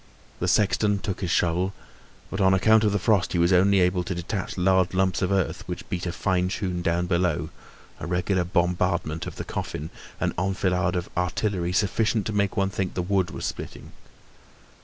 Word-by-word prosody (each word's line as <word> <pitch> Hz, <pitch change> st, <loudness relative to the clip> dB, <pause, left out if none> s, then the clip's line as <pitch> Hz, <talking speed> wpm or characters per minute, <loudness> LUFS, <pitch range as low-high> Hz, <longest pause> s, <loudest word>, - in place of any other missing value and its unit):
The -, -, -1 dB
sexton 105 Hz, 0 st, +2 dB
took 95 Hz, 0 st, -4 dB
his 90 Hz, -, -2 dB
shovel, 90 Hz, +3 st, +1 dB, 0.6 s
but 95 Hz, -, -2 dB
on 95 Hz, 0 st, +5 dB
account 110 Hz, +3 st, +4 dB
of 105 Hz, -, +3 dB
the 105 Hz, -, +1 dB
frost, 100 Hz, -3 st, +1 dB
he -, -, +1 dB
was 85 Hz, +2 st, +3 dB
only 95 Hz, +2 st, +5 dB
able 90 Hz, 0 st, +2 dB
to 90 Hz, -, -3 dB
detach 95 Hz, +4 st, -4 dB
large 95 Hz, 0 st, +2 dB
lumps 95 Hz, -1 st, +1 dB
of 95 Hz, 0 st, 0 dB
earth, 95 Hz, -3 st, 0 dB
which -, -, -6 dB
beat 90 Hz, 0 st, -3 dB
a -, -, -1 dB
fine 90 Hz, +1 st, 0 dB
tune 90 Hz, -2 st, -2 dB
down 85 Hz, +1 st, 0 dB
below, 85 Hz, -4 st, 0 dB, 0.5 s
a -, -, -5 dB
regular 90 Hz, +1 st, 0 dB
bombardment 85 Hz, -2 st, 0 dB
of -, -, -7 dB
the -, -, -5 dB
coffin, 75 Hz, +3 st, -5 dB, 0.3 s
an -, -, 0 dB
enfilade 90 Hz, -1 st, 0 dB
of 90 Hz, -1 st, -2 dB
artillery 90 Hz, 0 st, -1 dB
sufficient 105 Hz, +3 st, +1 dB
to 110 Hz, -, -2 dB
make 100 Hz, -2 st, 0 dB
one 95 Hz, 0 st, +1 dB
think 95 Hz, -3 st, -3 dB
the 90 Hz, -, -1 dB
wood 95 Hz, -1 st, +1 dB
was -, -, -5 dB
splitting. -, -, -6 dB
90 Hz, 190 wpm, -25 LUFS, 90-100 Hz, 0.6 s, on